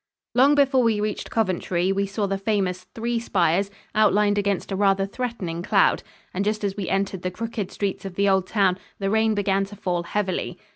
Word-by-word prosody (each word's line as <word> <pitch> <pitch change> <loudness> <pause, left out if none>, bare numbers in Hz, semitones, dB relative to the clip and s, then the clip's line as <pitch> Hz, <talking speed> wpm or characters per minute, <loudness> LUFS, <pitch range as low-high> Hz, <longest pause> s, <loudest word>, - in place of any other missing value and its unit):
Long 270 +4 +5
before 275 -2 +4
we 225 -3 +2
reached 210 0 -3
Coventry, 185 -3 0
we 200 +1 0
saw 200 +1 -2
the 195 0 -2
famous 190 -3 -1
"three 235 +1 -1
spires" 195 -3 +1 0.2
outlined 210 -1 +3
against 200 -1 -1
a - - 0
rather 195 0 +2
threatening 195 -6 -4
cloud, 190 - +3 0.3
and 190 - -1
just 215 +1 -1
as 195 -1 -1
we 200 -4 -4
entered 195 -1 -1
the 185 - -2
crooked 220 +1 -4
streets 200 -2 -3
of 190 -2 -7
the 200 +1 +2
old 190 -1 +2
town, 190 -4 +2 0.2
the 195 -1 -1
rain 220 0 +2
began 195 -1 +1
to 200 +1 -11
fall 180 -3 -1
heavily. 185 -1 -2
200 Hz, 195 wpm, -24 LUFS, 190-215 Hz, 0.3 s, Long